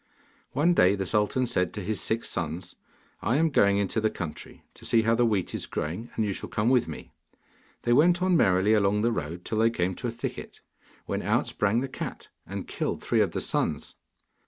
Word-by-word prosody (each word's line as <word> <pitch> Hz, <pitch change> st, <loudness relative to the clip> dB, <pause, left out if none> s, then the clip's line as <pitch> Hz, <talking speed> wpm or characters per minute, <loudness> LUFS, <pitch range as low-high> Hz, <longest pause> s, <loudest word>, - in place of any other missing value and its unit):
One 155 Hz, +6 st, +3 dB
day, 95 Hz, -, +5 dB
the 95 Hz, -1 st, -3 dB
sultan 105 Hz, +5 st, +1 dB
said 90 Hz, -6 st, 0 dB
to 105 Hz, -, -5 dB
his 105 Hz, +1 st, -2 dB
six 115 Hz, +1 st, -1 dB
sons, 85 Hz, +2 st, -4 dB, 0.5 s
'I 115 Hz, +6 st, +1 dB
am 165 Hz, +1 st, +3 dB
going 100 Hz, -6 st, +4 dB
into 100 Hz, +2 st, 0 dB
the 110 Hz, -, +2 dB
country, 85 Hz, -7 st, -7 dB
to -, -, -15 dB
see 115 Hz, -1 st, +3 dB
how 115 Hz, +1 st, +3 dB
the 120 Hz, +1 st, +3 dB
wheat 100 Hz, -5 st, -1 dB
is -, -, -3 dB
growing, 90 Hz, +10 st, -4 dB
and 110 Hz, -, +1 dB
you 100 Hz, -, -1 dB
shall -, -, -7 dB
come 105 Hz, +3 st, +1 dB
with 125 Hz, -2 st, +3 dB
me.' 80 Hz, -, -8 dB, 0.7 s
They 120 Hz, -, +3 dB
went 175 Hz, +7 st, +5 dB
on 185 Hz, 0 st, +2 dB
merrily 100 Hz, -, +4 dB
along 105 Hz, 0 st, +2 dB
the 120 Hz, -, +3 dB
road, 85 Hz, -3 st, -4 dB
till 110 Hz, -, -2 dB
they 115 Hz, +1 st, +5 dB
came 95 Hz, -5 st, -1 dB
to -, -, -3 dB
a -, -, -1 dB
thicket, 115 Hz, +1 st, -6 dB, 0.4 s
when -, -, -2 dB
out -, -, +1 dB
sprang 105 Hz, +3 st, 0 dB
the 135 Hz, -, -2 dB
cat, 130 Hz, -, -7 dB, 0.2 s
and -, -, -6 dB
killed -, -, -3 dB
three -, -, +2 dB
of -, -, +1 dB
the -, -, -2 dB
sons. -, -, -1 dB
110 Hz, 215 wpm, -27 LUFS, 95-120 Hz, 0.7 s, day